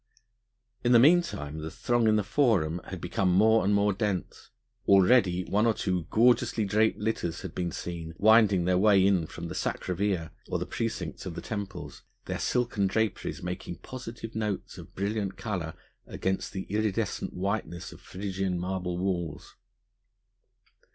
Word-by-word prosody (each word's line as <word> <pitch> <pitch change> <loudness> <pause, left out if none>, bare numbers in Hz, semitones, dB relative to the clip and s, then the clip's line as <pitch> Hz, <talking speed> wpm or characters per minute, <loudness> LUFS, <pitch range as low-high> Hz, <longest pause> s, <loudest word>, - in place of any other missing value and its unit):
In 120 0 +4
the 120 - +8
meanwhile 150 - +3
the 80 0 -5
throng 120 +6 +1
in 110 - +4
the 105 - +2
Forum 95 - +2
had 95 - -6
become 90 +2 0
more 110 +4 +5
and 100 - +2
more 100 0 +3
dense. 100 -2 -3 0.4
Already 95 -2 +5
one 105 +3 +2
or 115 - +2
two 90 -4 -1
gorgeously 115 -1 +3
draped 110 +3 +2
litters 105 -6 -2
had - - -6
been 90 -2 -2
seen 85 -2 -6
winding 105 -4 +5
their 90 0 +3
way 100 -2 +5
in 95 -5 +2
from 85 +2 -7
the - - -6
Sacra 90 - -2
Via 95 -4 -1 0.2
or - - 0
the - - -3
precincts 100 -6 -4
of 85 - -6
the - - -4
temples, 100 -1 -6 0.2
their - - -3
silken 120 -5 +1
draperies 110 -1 -1
making 90 -1 -5
positive 115 +2 -8
notes 105 -3 -3
of - - -13
brilliant 100 0 -2
colour 90 -8 -4 0.3
against 95 0 -2
the 95 -1 -4
iridescent 105 -1 -2
whiteness 95 -2 -3
of - - -13
Phrygian 95 -1 -3
marble 90 0 -3
walls. 85 -5 -3
95 Hz, 160 wpm, -28 LUFS, 90-110 Hz, 0.4 s, the